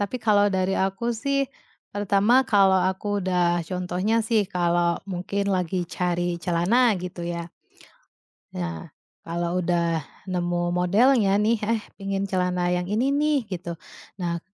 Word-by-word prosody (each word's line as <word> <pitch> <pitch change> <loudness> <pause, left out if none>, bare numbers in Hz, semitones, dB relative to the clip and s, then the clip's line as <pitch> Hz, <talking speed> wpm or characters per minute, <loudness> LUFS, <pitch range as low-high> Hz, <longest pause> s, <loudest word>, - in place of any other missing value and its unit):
Tapi 205 +5 -2
kalau 210 -3 +3
dari 190 -1 0
aku 195 +4 -1
sih, 275 +5 0 0.5
pertama, 205 +4 +3
kalau 195 -2 +5
aku 205 +2 -2
sudah 175 -2 +1
contohnya 180 +3 -1
sih 225 -2 +3
kalau, 175 -2 +1 0.2
mungkin 200 +3 -2
lagi 180 -1 -1
cari 175 0 -2
celana, 195 +7 +3
gitu 180 -1 -7
ya 170 0 -5 1.1
Nah, 85 -2 -4 0.3
kalau 170 +2 -2
udah 170 -2 0 0.2
nemu 175 -2 -1
modelnya 200 +4 +3
nih, 215 +2 +2
"Eh, 220 +1 0 0.2
pengen 195 0 -2
celana 180 -2 0
yang 180 0 -1
ini 240 +7 +1
nih," 290 -2 +1
gitu. 175 -4 -6 0.4
Nah, 170 -2 -2
185 Hz, 130 wpm, -24 LUFS, 175-205 Hz, 1.1 s, kalau